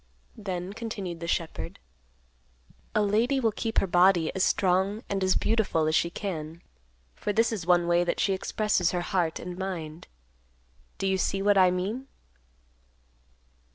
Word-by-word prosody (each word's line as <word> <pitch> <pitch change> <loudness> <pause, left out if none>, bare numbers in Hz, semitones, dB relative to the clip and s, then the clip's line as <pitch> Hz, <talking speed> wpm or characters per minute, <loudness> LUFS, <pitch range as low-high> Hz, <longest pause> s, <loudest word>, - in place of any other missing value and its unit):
Then, 185 -2 -4
continued 200 -6 -5
the 170 - -5
shepherd, 170 -2 -3 1.2
"A 210 - +3
lady 230 +7 +2
will 230 -4 +2
keep 225 +2 -4
her - - +4
body 175 -2 +4
as 190 - 0
strong 190 +4 +1
and 195 -1 -1
as 185 0 +3
beautiful 215 -8 +1
as 155 - +1
she 170 - +2
can, 170 -3 -5 0.5
for 210 - -3
this 225 +3 +2
is 190 -6 -4
one 175 -1 +4
way 175 0 +3
that 175 - -2
she 195 - +2
expresses 190 -2 0
her 175 - 0
heart 175 -2 0
and 180 +1 -7
mind. 170 -4 -5 0.9
Do 195 - -3
you 190 0 +1
see 195 +1 0
what 205 0 +4
I 185 -2 +6
mean?" 200 +9 -3
190 Hz, 155 wpm, -27 LUFS, 175-205 Hz, 1.2 s, I